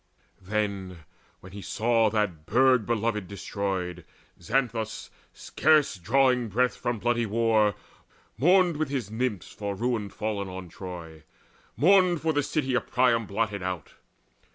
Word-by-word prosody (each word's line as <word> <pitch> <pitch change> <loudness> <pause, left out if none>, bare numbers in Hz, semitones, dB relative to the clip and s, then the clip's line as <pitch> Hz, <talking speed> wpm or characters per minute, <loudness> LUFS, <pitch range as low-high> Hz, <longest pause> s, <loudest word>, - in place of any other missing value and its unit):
Then, 95 -3 -3 0.4
when 95 - -12
he 100 +1 -8
saw 115 +3 +2
that 100 -8 -2
burg 125 -1 +4
beloved 110 -4 -1
destroyed, 95 -3 -4 0.4
Xanthus, 115 +1 -2 0.2
scarce 150 -7 +2
drawing 125 +5 +2
breath 125 +5 +1
from 120 -1 -2
bloody 120 +1 0
war, 110 -2 +2 0.6
Mourned 175 - +4
with 155 -2 -1
his 125 -7 -3
Nymphs 110 -5 -2
for 100 -1 -4
ruin 115 -2 -1
fallen 100 -1 -3
on 95 -1 -8
Troy, 85 -3 -9 0.6
Mourned 185 +1 +5
for 160 -1 +1
the 145 - +2
city 140 -2 -1
of 125 - 0
Priam 120 -4 +2
blotted 100 -1 -2
out. 90 -4 -5
110 Hz, 130 wpm, -27 LUFS, 100-125 Hz, 0.6 s, Mourned